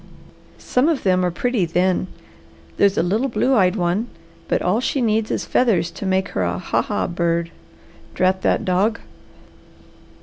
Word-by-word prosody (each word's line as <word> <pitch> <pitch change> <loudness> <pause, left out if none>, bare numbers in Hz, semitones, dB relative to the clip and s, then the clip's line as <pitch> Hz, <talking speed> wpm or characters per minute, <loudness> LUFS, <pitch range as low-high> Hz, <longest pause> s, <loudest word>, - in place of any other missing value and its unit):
Some 255 +6 +1
of 315 -5 -1
them 185 -1 +2
are 180 - +2
pretty, 235 +4 -1
then. 180 +2 0 0.7
There's 200 -1 +3
a - - +3
little 215 +9 0
blue 265 +1 +1
eyed 190 -5 +3
one, 185 +4 0 0.4
but - - +1
all 185 +5 +1
she 275 - -1
needs 220 -2 +1
is - - -2
feathers 180 -9 +1
to 200 - -6
make 190 0 0
her - - -3
a 90 0 -1
'ha! - - 0
ha! - - -2
bird.' 170 -1 -1 0.6
Drat 185 +1 +1
that - - +1
dog!" 195 +5 +1
185 Hz, 165 wpm, -21 LUFS, 175-225 Hz, 0.7 s, There's